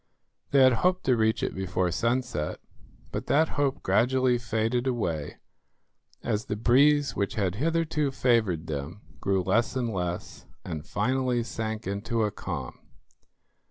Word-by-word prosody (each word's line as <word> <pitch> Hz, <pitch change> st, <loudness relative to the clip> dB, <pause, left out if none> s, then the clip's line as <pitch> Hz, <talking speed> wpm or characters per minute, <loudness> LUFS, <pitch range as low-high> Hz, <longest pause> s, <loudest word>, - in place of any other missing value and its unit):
They 140 Hz, -1 st, +5 dB
had 130 Hz, -1 st, +6 dB
hoped 185 Hz, 0 st, +2 dB
to 130 Hz, -, +3 dB
reach 110 Hz, -1 st, +1 dB
it -, -, -1 dB
before 95 Hz, -1 st, -1 dB
sunset, 115 Hz, -7 st, -1 dB, 0.5 s
but -, -, -4 dB
that 155 Hz, +3 st, +3 dB
hope 145 Hz, -1 st, -1 dB
gradually 125 Hz, +1 st, +2 dB
faded 115 Hz, +2 st, -1 dB
away, 85 Hz, -, -2 dB, 0.9 s
as 105 Hz, +1 st, -1 dB
the 105 Hz, -, -3 dB
breeze 140 Hz, +6 st, +4 dB
which 100 Hz, +1 st, -1 dB
had 95 Hz, -5 st, 0 dB
hitherto 155 Hz, -, 0 dB
favoured 115 Hz, -11 st, +1 dB
them 75 Hz, +5 st, -5 dB, 0.2 s
grew 95 Hz, -2 st, +1 dB
less 115 Hz, +7 st, +1 dB
and 120 Hz, -3 st, -1 dB
less, 90 Hz, -2 st, -4 dB, 0.2 s
and 80 Hz, +1 st, -5 dB
finally 130 Hz, -2 st, 0 dB
sank 110 Hz, 0 st, -4 dB
into 105 Hz, +3 st, -1 dB
a 105 Hz, -, 0 dB
calm. -, -, -6 dB
115 Hz, 140 wpm, -27 LUFS, 100-130 Hz, 0.9 s, had